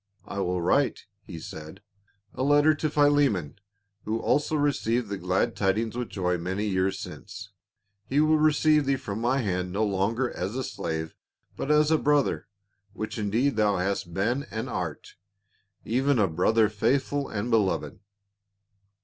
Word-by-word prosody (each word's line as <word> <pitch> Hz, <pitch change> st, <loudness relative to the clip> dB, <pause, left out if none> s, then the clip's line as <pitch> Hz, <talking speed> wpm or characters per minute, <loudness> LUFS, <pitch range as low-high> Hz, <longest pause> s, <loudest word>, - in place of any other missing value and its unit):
" 100 Hz, -1 st, -37 dB
I 100 Hz, -, -5 dB
will 90 Hz, -1 st, 0 dB
write," 135 Hz, +10 st, +1 dB, 0.2 s
he 90 Hz, -5 st, -9 dB
said, 80 Hz, +2 st, -9 dB, 0.5 s
"a -, -, -5 dB
letter 145 Hz, +3 st, +5 dB
to 155 Hz, +1 st, -2 dB
Phile 145 Hz, -1 st, +4 dB
mon 85 Hz, -8 st, -5 dB, 0.2 s
— 100 Hz, 0 st, -49 dB
who 110 Hz, +1 st, -1 dB
also 150 Hz, +6 st, +1 dB
received 125 Hz, -6 st, 0 dB
the 100 Hz, -, -3 dB
glad 90 Hz, +1 st, 0 dB
tidings 110 Hz, +3 st, 0 dB
with 125 Hz, -1 st, -3 dB
joy 90 Hz, -2 st, -1 dB
many 95 Hz, +5 st, -2 dB
years 95 Hz, -1 st, 0 dB
since; -, -, -9 dB, 0.6 s
he 140 Hz, -, +2 dB
will 155 Hz, 0 st, +4 dB
receive 155 Hz, -1 st, +3 dB
thee 140 Hz, -, +3 dB
from 110 Hz, -5 st, -5 dB
my 125 Hz, +3 st, +2 dB
hand 90 Hz, -2 st, -2 dB
no 105 Hz, +4 st, 0 dB
longer 105 Hz, +6 st, 0 dB
as 95 Hz, +5 st, -3 dB
a 130 Hz, -, -2 dB
slave 80 Hz, -7 st, -4 dB, 0.4 s
but 135 Hz, -, -4 dB
as 150 Hz, 0 st, +4 dB
a 160 Hz, -, +4 dB
brother, 145 Hz, -1 st, +1 dB, 0.5 s
which 110 Hz, +1 st, -5 dB
indeed 110 Hz, +5 st, 0 dB
thou 105 Hz, -2 st, +3 dB
hast 95 Hz, -1 st, -2 dB
been 120 Hz, -, -1 dB
and 110 Hz, 0 st, -4 dB
art -, -, -5 dB, 0.3 s
— -, -, -40 dB, 0.3 s
even 130 Hz, +4 st, +1 dB
a 105 Hz, -3 st, +3 dB
brother 105 Hz, +7 st, +3 dB
faithful 135 Hz, +6 st, 0 dB
and 110 Hz, +3 st, -3 dB
be 115 Hz, -, +6 dB
loved." 100 Hz, -3 st, -1 dB
110 Hz, 170 wpm, -26 LUFS, 95-140 Hz, 0.6 s, be